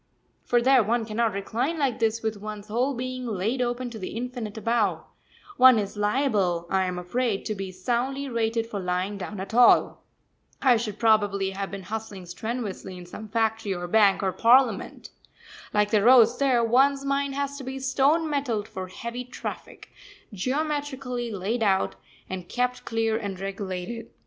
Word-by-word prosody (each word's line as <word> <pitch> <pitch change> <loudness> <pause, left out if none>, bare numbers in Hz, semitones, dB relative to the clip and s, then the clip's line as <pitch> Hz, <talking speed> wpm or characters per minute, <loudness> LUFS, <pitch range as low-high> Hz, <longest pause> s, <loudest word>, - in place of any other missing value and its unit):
For 240 -1 +1
there 265 0 +6
one 225 +2 0
cannot 225 +1 0
recline 235 +11 -2
like 275 -6 0
this 225 0 0
with 220 -1 -1
one's 210 0 -8
whole 250 +5 0
being 255 0 -4
laid 220 +4 -1
open 245 0 -2
to 225 - -8
the 185 - -6
infinite 240 -3 -5
above 230 -1 0 0.5
one 255 -2 +8
is 205 -1 -2
liable, 205 -6 +1
I 190 -1 +2
am 180 -1 -3
afraid, 205 +4 -1
to 215 - -1
be 195 -2 -5
soundly 245 +9 -2
rated 230 -2 0
for 220 -3 -5
lying 185 +2 -2
down 200 +1 -6
at 195 +3 -6
all. 245 +1 +5 0.6
I 255 -3 +5
should 215 -3 -4
probably 205 -4 +2
have 195 0 -4
been 200 -1 -7
hustling 205 -1 -6
strenuously 200 0 -5
in 180 - -10
some 215 +5 -9
factory 220 -2 0
or 175 0 -5
bank, 205 0 +4
or 190 - +1
Parliament. 245 +6 +2 0.6
Like 210 0 +1
the 215 -2 +4
roads 240 +1 +6
there, 260 -4 +3
one's 270 +4 +3
mind 275 0 0
has 280 0 -2
to - - -7
be 265 +1 -5
stone 275 +5 +2
metalled 260 -8 -1
for 185 -1 -6
heavy 235 +5 -6
traffic 250 - -8 0.4
geometrically 265 +1 -2
laid 210 +4 -2
out, 195 -3 +2 0.3
and 185 -2 -6
kept 250 0 -1
clear 225 -1 0
and 200 -4 -5
regulated. 195 +3 -5
225 Hz, 170 wpm, -26 LUFS, 200-250 Hz, 0.6 s, one